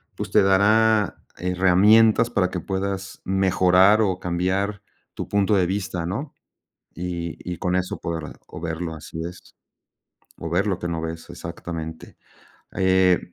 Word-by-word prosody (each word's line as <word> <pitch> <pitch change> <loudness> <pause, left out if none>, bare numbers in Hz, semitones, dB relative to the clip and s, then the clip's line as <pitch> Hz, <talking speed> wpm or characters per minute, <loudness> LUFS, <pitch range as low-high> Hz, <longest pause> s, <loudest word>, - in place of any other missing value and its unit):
pues - - -5
te - - +5
dará 105 +2 +3 0.2
herramientas 100 +6 +4
para 100 -6 +1
que 90 - -3
puedas 95 +1 -4
mejorar 95 +2 +4
o 95 -3 0
cambiar 95 +3 -1 0.3
tu - - -6
punto 100 +1 +2
de 95 -2 +3
vista, 95 -3 -3
¿no?, 115 - -4 0.6
y 85 -1 -4 0.2
y 85 - -6
con 90 +1 0
eso 90 0 -2
podrá 80 -3 -4 0.2
o - - -9
verlo 80 0 -4
así 80 +1 -8
es, 90 - -14 0.8
o 85 - -5
ver 90 +5 +1
lo 95 -2 -1
que 85 - -5
no 85 -1 -2
ves 80 0 -6
exactamente, 80 -1 -7 0.6
eh 95 -1 +2
90 Hz, 145 wpm, -23 LUFS, 85-100 Hz, 0.8 s, te